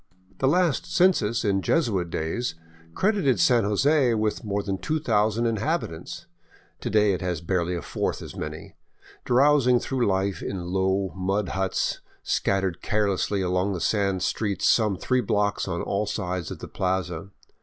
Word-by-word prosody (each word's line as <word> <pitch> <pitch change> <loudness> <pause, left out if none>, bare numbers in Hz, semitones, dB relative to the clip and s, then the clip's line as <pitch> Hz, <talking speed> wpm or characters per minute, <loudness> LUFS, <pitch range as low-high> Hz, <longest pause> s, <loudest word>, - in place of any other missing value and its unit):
The 135 - +2
last 175 0 +1
census 115 - +2
in 100 -1 +2
Jesuit 100 - +1
days 85 +9 -2 0.4
credited 185 - +2
San 115 +5 +4
Jose 130 +4 +3
with 110 +2 -1
more 100 -1 -2
than 95 -1 -3
2000 115 - +1
inhabitants. 115 - -2 0.5
To - - -4
day 105 -1 +3
it 90 - -3
has 90 -3 -2
barely 85 +1 -1
a 85 - -5
fourth - - -2
as - - -9
many, - - -7 0.5
drowsing 125 -1 +4
through 125 -2 -1
life 95 0 0
in 90 -2 -4
low, 95 0 0
mud 95 +1 -1
huts 95 0 -1 0.2
scattered 95 -3 0
carelessly 100 -2 0
along 90 +2 0
the 90 - -3
sand 100 -1 0
streets 105 -3 0
some 105 -4 +3
three 130 +5 +1
blocks 100 -2 0
on 85 -2 -2
all 100 +1 -1
sides 90 -4 -3
of - - -6
the - - -8
plaza. 90 -1 -2
100 Hz, 155 wpm, -25 LUFS, 95-120 Hz, 0.5 s, San